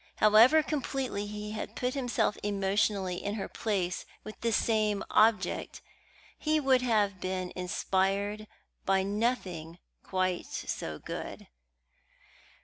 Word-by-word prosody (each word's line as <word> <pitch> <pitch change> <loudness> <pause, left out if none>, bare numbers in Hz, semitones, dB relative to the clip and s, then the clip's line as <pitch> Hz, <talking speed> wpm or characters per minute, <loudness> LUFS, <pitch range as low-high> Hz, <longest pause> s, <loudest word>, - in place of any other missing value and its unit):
However 225 +9 +6
completely 265 -8 -2
he 210 0 -6
had 215 - -5
put 250 0 -1
himself 245 -6 0
emotionally 195 -2 0
in 205 +1 -2
her 200 - -3
place 185 -5 -2 0.2
with 215 - -10
this 230 -2 +1
same 215 -3 +1
object, 215 -4 +2 0.6
he 310 0 +2
would 265 -3 +3
have 210 -6 +1
been 185 -1 -3
inspired 195 +3 0 0.4
by 190 0 +2
nothing 195 -6 -2 0.2
quite 185 -1 -1
so 80 -1 -4
good. - - -7
205 Hz, 115 wpm, -30 LUFS, 190-230 Hz, 0.6 s, However